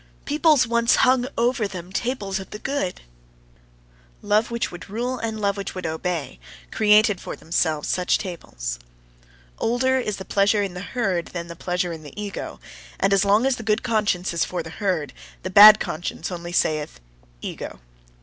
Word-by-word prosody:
Peoples 300 Hz, -2 st, +4 dB
once 235 Hz, 0 st, +3 dB
hung 255 Hz, -1 st, +3 dB
over 235 Hz, -2 st, +1 dB
them 180 Hz, -2 st, -8 dB
tables 210 Hz, -5 st, -2 dB
of 190 Hz, -, -9 dB
the -, -, -7 dB
good. 270 Hz, -7 st, -3 dB, 1.2 s
Love 210 Hz, +2 st, +2 dB
which 235 Hz, 0 st, -2 dB
would 175 Hz, +2 st, -10 dB
rule 245 Hz, +4 st, -3 dB
and 220 Hz, -1 st, -3 dB
love 200 Hz, -1 st, 0 dB
which 200 Hz, -, -5 dB
would 185 Hz, -2 st, -5 dB
obey, 160 Hz, -, -3 dB, 0.3 s
created 210 Hz, -2 st, +4 dB
for -, -, -6 dB
themselves 160 Hz, -2 st, -1 dB
such 180 Hz, -1 st, +1 dB
tables. -, -, -6 dB, 0.8 s
Older 260 Hz, +3 st, +2 dB
is 210 Hz, -5 st, -3 dB
the 190 Hz, -, -8 dB
pleasure 205 Hz, +2 st, +2 dB
in 195 Hz, -3 st, -4 dB
the 180 Hz, -, -6 dB
herd 195 Hz, -5 st, -1 dB
than 170 Hz, -1 st, -6 dB
the 170 Hz, -, -7 dB
pleasure 180 Hz, 0 st, -2 dB
in 160 Hz, -, -8 dB
the 150 Hz, +6 st, -11 dB
ego: 205 Hz, -1 st, -6 dB, 0.4 s
and 195 Hz, 0 st, +2 dB
as 195 Hz, 0 st, +4 dB
long 205 Hz, +4 st, +3 dB
as 265 Hz, -1 st, +2 dB
the -, -, -6 dB
good 215 Hz, 0 st, 0 dB
conscience 210 Hz, -7 st, 0 dB
is 170 Hz, -, +1 dB
for 175 Hz, -2 st, -3 dB
the 160 Hz, -, -9 dB
herd, 180 Hz, -7 st, -2 dB, 0.3 s
the 185 Hz, -, -4 dB
bad 210 Hz, +2 st, +10 dB
conscience 175 Hz, +4 st, -4 dB
only 175 Hz, -1 st, -6 dB
saith: 155 Hz, -, 0 dB, 0.4 s
ego. -, -, -6 dB
200 Hz, 175 wpm, -23 LUFS, 175-230 Hz, 1.2 s, bad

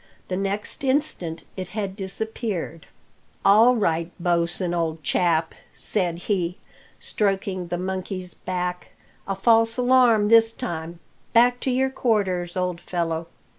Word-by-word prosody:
The 185 Hz, -, -1 dB
next 200 Hz, +6 st, -3 dB
instant 260 Hz, -, -1 dB
it 185 Hz, -1 st, -5 dB
had 195 Hz, -2 st, -2 dB
disappeared. 195 Hz, -4 st, -4 dB, 0.6 s
"All 225 Hz, +5 st, +6 dB
right, 170 Hz, -5 st, 0 dB
Bosin, 175 Hz, +1 st, 0 dB
old 165 Hz, -2 st, -2 dB
chap," 165 Hz, +2 st, +1 dB, 0.2 s
said 180 Hz, -5 st, +3 dB
he, 180 Hz, -4 st, -1 dB, 0.4 s
stroking 195 Hz, -3 st, -1 dB
the 175 Hz, -, -2 dB
monkeys 185 Hz, 0 st, -4 dB
back; 180 Hz, -1 st, -4 dB, 0.3 s
"a 195 Hz, -, -1 dB
false 225 Hz, +3 st, +3 dB
alarm 245 Hz, -4 st, +4 dB
this 225 Hz, 0 st, +6 dB
time 170 Hz, -8 st, -5 dB, 0.3 s
back 245 Hz, +1 st, +5 dB
to 265 Hz, -, -2 dB
your 265 Hz, +1 st, +1 dB
quarters, 190 Hz, -9 st, 0 dB
old 180 Hz, -1 st, -2 dB
fellow!" 165 Hz, -2 st, -2 dB
190 Hz, 125 wpm, -24 LUFS, 175-225 Hz, 0.6 s, All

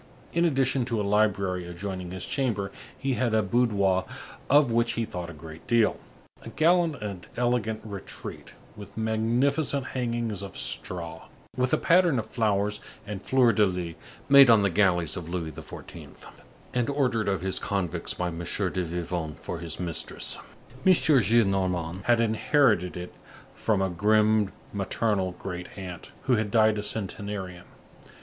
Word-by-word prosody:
In 170 Hz, +1 st, +3 dB
addition 135 Hz, -4 st, +2 dB
to 115 Hz, -3 st, -1 dB
a -, -, 0 dB
library 100 Hz, -3 st, +1 dB
adjoining 90 Hz, +1 st, -5 dB
his 95 Hz, 0 st, -4 dB
chamber, 110 Hz, -8 st, -1 dB, 0.3 s
he 135 Hz, 0 st, -1 dB
had 120 Hz, -3 st, +1 dB
a 110 Hz, -, +3 dB
boudoir 100 Hz, -4 st, +2 dB, 0.4 s
of 145 Hz, -4 st, +5 dB
which 115 Hz, +1 st, +2 dB
he 115 Hz, -, -1 dB
thought 90 Hz, -4 st, -6 dB
a -, -, -6 dB
great 80 Hz, 0 st, -11 dB
deal, 115 Hz, -3 st, +3 dB, 0.4 s
a -, -, -9 dB
gallant 170 Hz, 0 st, +3 dB
and 100 Hz, -4 st, -6 dB
elegant 120 Hz, -3 st, 0 dB
retreat, 100 Hz, -3 st, -8 dB, 0.2 s
with 105 Hz, +1 st, -11 dB
magnificent 125 Hz, +6 st, +1 dB
hangings 120 Hz, -5 st, -2 dB
of 100 Hz, -, -8 dB
straw, 85 Hz, -2 st, -4 dB, 0.3 s
with 125 Hz, 0 st, 0 dB
a -, -, +4 dB
pattern 170 Hz, -4 st, +4 dB
of 110 Hz, -, -1 dB
flowers 105 Hz, -3 st, 0 dB, 0.3 s
and 105 Hz, -2 st, -5 dB
fleurs 125 Hz, -1 st, +4 dB
de 105 Hz, -, +4 dB
lys 90 Hz, -3 st, -4 dB, 0.3 s
made 140 Hz, -2 st, +8 dB
on 110 Hz, -3 st, +6 dB
the 100 Hz, -, +2 dB
galleys 90 Hz, -4 st, +2 dB
of 85 Hz, -3 st, -6 dB
Louis 85 Hz, -3 st, -3 dB
XIV. -, -, -10 dB, 0.6 s
and 125 Hz, +1 st, 0 dB
ordered 125 Hz, -7 st, +1 dB
of 95 Hz, -3 st, -1 dB
his 95 Hz, 0 st, -2 dB
convicts 95 Hz, -5 st, -2 dB
by 90 Hz, -1 st, -1 dB
M. 85 Hz, -1 st, -6 dB
de 95 Hz, 0 st, -1 dB
Vivonne 85 Hz, -2 st, -3 dB
for 85 Hz, -, -6 dB
his 85 Hz, -1 st, -6 dB
mistress. 85 Hz, -3 st, -2 dB, 0.4 s
M. 190 Hz, -, +7 dB
Gillenormand 95 Hz, -, +2 dB
had 120 Hz, -1 st, +4 dB
inherited 110 Hz, -, +2 dB
it 90 Hz, 0 st, -7 dB, 0.4 s
from 100 Hz, -3 st, 0 dB
a 95 Hz, -, 0 dB
grim 105 Hz, +2 st, +3 dB, 0.2 s
maternal 100 Hz, -1 st, 0 dB
great 90 Hz, -1 st, -6 dB
aunt, 90 Hz, -3 st, -8 dB
who 125 Hz, -, +3 dB
had 110 Hz, -1 st, -1 dB
died 110 Hz, 0 st, +4 dB
a -, -, -1 dB
centenarian. 100 Hz, -3 st, -4 dB
105 Hz, 155 wpm, -27 LUFS, 90-120 Hz, 0.6 s, made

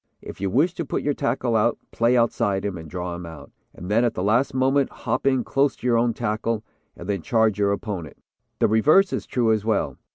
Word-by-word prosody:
If -, -, -10 dB
you 100 Hz, -, 0 dB
wish 150 Hz, -, +2 dB
to 170 Hz, -, -4 dB
put 140 Hz, -, -3 dB
your 145 Hz, -, +1 dB
tackle 130 Hz, -4 st, -1 dB
out, 110 Hz, +2 st, +2 dB
play 120 Hz, +2 st, +2 dB
outside 105 Hz, -4 st, +1 dB
him, 100 Hz, -2 st, -2 dB
and 80 Hz, -2 st, -9 dB
draw 90 Hz, +1 st, -4 dB
him 90 Hz, -, -7 dB
out, 80 Hz, -4 st, -11 dB, 0.2 s
and 90 Hz, -, -10 dB
then 110 Hz, +4 st, +2 dB
at 120 Hz, -, 0 dB
the 90 Hz, -, -2 dB
last 115 Hz, +7 st, +2 dB
moment 135 Hz, +1 st, +2 dB
hop -, -, -3 dB
in 130 Hz, -2 st, +2 dB
close 140 Hz, 0 st, +1 dB
to -, -, -12 dB
your 120 Hz, -2 st, +3 dB
own 115 Hz, -1 st, +1 dB
tackle, 110 Hz, 0 st, -2 dB, 0.3 s
and 85 Hz, -, -9 dB
then 100 Hz, -3 st, -1 dB
charge 110 Hz, 0 st, +1 dB
your 100 Hz, -1 st, +2 dB
opponent. 100 Hz, -, -5 dB, 0.4 s
The -, -, +3 dB
reverse 155 Hz, -, +4 dB
is -, -, -3 dB
true 120 Hz, -3 st, +1 dB
as 110 Hz, -2 st, -1 dB
well. 110 Hz, 0 st, -1 dB
110 Hz, 230 wpm, -23 LUFS, 100-125 Hz, 0.4 s, reverse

